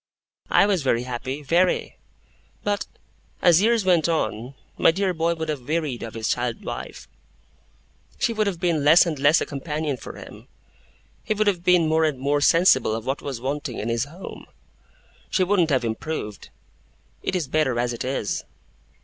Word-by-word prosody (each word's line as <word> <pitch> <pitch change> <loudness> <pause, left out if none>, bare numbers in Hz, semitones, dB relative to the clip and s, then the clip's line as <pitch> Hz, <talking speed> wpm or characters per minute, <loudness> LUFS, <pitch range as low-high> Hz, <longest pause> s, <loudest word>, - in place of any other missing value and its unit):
'I - - +5
was 195 -4 +1
very 125 -3 +1
happy, 130 +3 -5
very. 175 +5 +1 0.6
But, 205 -1 -1 0.5
as 175 0 +5
years 225 -1 +2
went 170 -3 +3
on, 130 -5 -2 0.2
my - - +4
dear 185 +2 0
boy 165 0 0
would 160 -1 -4
have 140 -5 -4
wearied 155 -6 -1
of 115 -1 -7
his 110 0 -3
child 120 -1 -2
wife. - - -7 1.1
She 230 - 0
would 215 -1 0
have 185 -4 -2
been 170 -5 0
less 155 +5 +7
and 160 -5 -3
less 145 +4 +4
a - - 0
companion 150 0 -3
for - - -9
him. - - -12 0.8
He 215 - -1
would 215 +1 +1
have 185 -4 0
been 180 -3 +4
more 160 +1 +2
and 150 -4 -1
more 145 +2 0
sensible 145 -9 +4
of 115 0 -6
what 135 +2 -2
was 135 -4 -5
wanting 135 0 -4
in 110 - -3
his 115 +2 0
home. 165 +7 -10 0.8
She 185 - +2
wouldn't 180 -3 +2
have 130 -4 +1
improved. 110 -2 -5 0.7
It - - -2
is 170 -6 -1
better 135 -4 +1
as 120 0 0
it 120 - -5
is. 130 -5 -2
155 Hz, 175 wpm, -23 LUFS, 130-175 Hz, 1.1 s, less